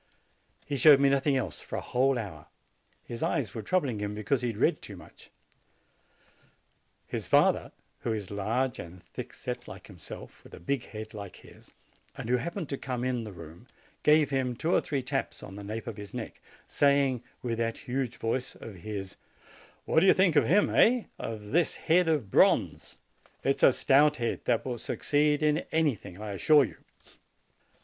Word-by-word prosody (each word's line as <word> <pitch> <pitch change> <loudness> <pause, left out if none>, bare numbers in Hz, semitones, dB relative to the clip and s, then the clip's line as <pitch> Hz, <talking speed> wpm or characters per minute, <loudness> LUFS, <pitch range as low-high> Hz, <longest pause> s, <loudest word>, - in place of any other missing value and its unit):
He 145 - -3
showed 140 +1 +8
me 140 0 +4
nothing 140 0 +2
else 95 -11 -3
for - - -7
a - - -2
whole 130 +1 +1
hour. 80 -9 -7 0.6
His 115 -1 -7
eyes 120 -10 -1
were 110 - -4
troubling 130 - 0
him, 105 0 -3
because 110 +5 0
he 125 - -1
had 115 -3 -4
read - - +2
too - - -9
much. - - -16 1.8
His - - -5
father, - - +3 0.3
who 120 - -2
is 105 -4 -4
large 115 +5 -1
and 85 +1 -10
thickset - - -7
like - - -10
himself, - - -11
with - - -12
a - - -12
big 130 +8 -2
head 110 0 -8
like 100 -3 -8
his, - - -17 0.5
and - - -6
who 125 - +4
happened 170 - -4
to 140 - -4
come 125 -2 -3
in 125 -3 -1
the 105 - -7
room, 85 +5 -12 0.3
gave 150 -1 +4
him 130 -2 0
two 160 +8 -1
or - - +4
three 140 -3 -2
taps 125 - -3
on - - -9
the 100 - -8
nape 110 +3 -5
of 115 -3 -6
the 105 -1 -8
neck, 120 -3 -7 0.3
saying 140 -3 +2 0.2
with 115 -2 -2
that 115 -1 -1
huge 125 -1 -3
voice 125 +3 -2
of 105 -4 -10
his: 95 0 -6 0.7
"What - - +3
do 190 - +4
you - - +7
think 185 -4 +3
of 140 -6 +4
him, 200 +7 +3
eh? 240 0 +4 0.2
of 105 -2 -6
this 170 +3 +2
head 175 +2 +2
of 145 -12 0
bronze? - - +2 0.5
It 135 0 +2
is - - -6
a - - +8
stout 145 +4 +4
head, 115 -1 -3
that 120 -2 +1
will 125 -3 -3
succeed 150 +4 +1
in 150 0 +3
any 160 -3 +3
thing, 90 -3 -11
I 105 -1 -5
assure 145 +9 +5
you!" - - -6
125 Hz, 190 wpm, -29 LUFS, 110-145 Hz, 1.8 s, showed